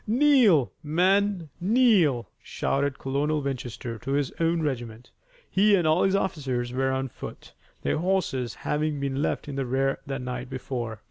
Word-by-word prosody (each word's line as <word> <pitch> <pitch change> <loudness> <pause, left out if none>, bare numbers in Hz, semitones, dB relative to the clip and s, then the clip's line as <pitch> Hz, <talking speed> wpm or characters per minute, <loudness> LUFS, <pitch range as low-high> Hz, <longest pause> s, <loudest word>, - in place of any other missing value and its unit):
"Kneel, 235 - +4
men! 180 +2 +1
Kneel!" 190 - +3
shouted 140 0 -1
Colonel 145 +3 0
Winchester 120 -4 -4
to 135 +6 -3
his 140 -2 0
own 165 0 +1
regiment. 120 -4 -4 0.4
He 205 +2 +4
and 175 -4 +1
all 155 +3 +3
his 195 0 +3
officers 130 -10 -2
were 130 +1 +1
on 130 0 -1
foot, 125 - -10 0.3
their - - 0
horses 170 -9 -1
having 150 0 0
been 140 0 -2
left 155 - -1
in 140 -1 -5
the 135 - -1
rear 135 +2 0
the 135 -1 -2
night 125 0 -5
before. 125 -4 -4
140 Hz, 155 wpm, -26 LUFS, 130-180 Hz, 0.4 s, Kneel